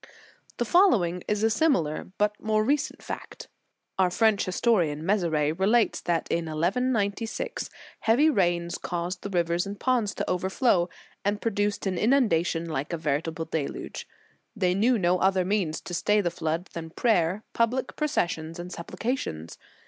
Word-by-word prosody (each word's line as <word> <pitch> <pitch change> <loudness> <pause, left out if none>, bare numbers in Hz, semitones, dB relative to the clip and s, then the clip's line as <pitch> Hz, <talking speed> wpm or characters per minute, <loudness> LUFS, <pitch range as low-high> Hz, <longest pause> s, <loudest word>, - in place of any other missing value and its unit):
"* - - -29
The 240 - 0
following 210 - +3
is 210 0 0
a 225 - +3
similar, 200 - +1
but 210 0 +2
more 215 0 +1
recent 290 +5 -1
fact - - -7 0.5
Our 185 -1 +4
French 220 +2 +2
historian, 175 -6 +1
Mezeray, 165 -7 +1
relates 205 +7 +2
that 170 -2 -1
in 170 0 0
1196, 210 - -1 0.3
heavy 240 +8 +4
rains 175 - +1
caused 175 +1 -3
the 200 - -5
rivers 175 0 0
and 200 0 -6
ponds 240 -6 +1
to - - -3
overflow, 185 0 +1 0.3
and 205 +1 0
produced 205 -2 -1
an 190 -2 -1
inunda 220 -7 +3
tion 170 -1 -2
like 150 0 -3
a - - 0
veritable 160 +2 -2
deluge. 160 -3 -4 0.5
They 185 -4 +2
knew 230 +6 +3
no 180 -2 +2
other 190 -1 +2
means 185 -5 0
to 175 - -8
stay 210 +4 +2
the 175 -4 0
flood 165 +1 -3
than 165 -1 -6
prayer, 185 0 +1
public 245 +3 0
processions, 165 - -1
and 175 +1 -7
supplications. 170 - -4
185 Hz, 155 wpm, -27 LUFS, 170-220 Hz, 0.5 s, Our